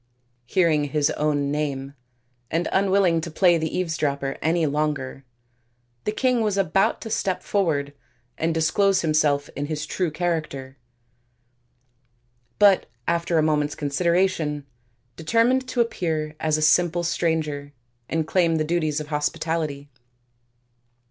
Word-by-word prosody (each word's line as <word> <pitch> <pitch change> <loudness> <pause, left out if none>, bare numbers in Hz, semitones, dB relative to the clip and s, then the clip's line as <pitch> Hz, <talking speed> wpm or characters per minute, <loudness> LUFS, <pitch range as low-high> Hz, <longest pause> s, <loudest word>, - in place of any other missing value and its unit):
Hearing 160 -4 +2
his 145 +1 +1
own 145 -2 0
name, 140 -2 -3 0.6
and 165 +2 0
unwilling 190 -3 +3
to 170 - -5
play 175 +1 +3
the 160 0 -2
eavesdropper 145 -6 -1
any 165 +1 +1
longer, 145 -2 -2 0.8
the - - +1
king 250 +1 +1
was 210 -3 0
about 195 0 +1
to 225 - -7
step 190 -4 -1
forward 150 -8 0 0.4
and 165 +1 0
dis 160 0 +1
close 195 -2 +3
himself 150 -3 +2
in 145 +1 -3
his 155 0 -3
true 180 +2 -1
character, 155 -5 -3 1.8
but 200 -2 +5 0.2
after 170 0 +1
a 155 - +3
moment's 150 -1 +1
consideration 160 -1 0 0.5
determined 230 +9 +2
to 255 -1 +1
appear 160 -9 -2
as 155 -1 +1
a 155 - -1
simple 175 +2 +3
stranger 155 -4 -1 0.4
and 160 -1 0
claim 170 -1 +2
the 155 - +1
duties 155 -2 0
of 150 0 -7
hospitality. 150 -1 -2
160 Hz, 130 wpm, -24 LUFS, 150-175 Hz, 1.8 s, but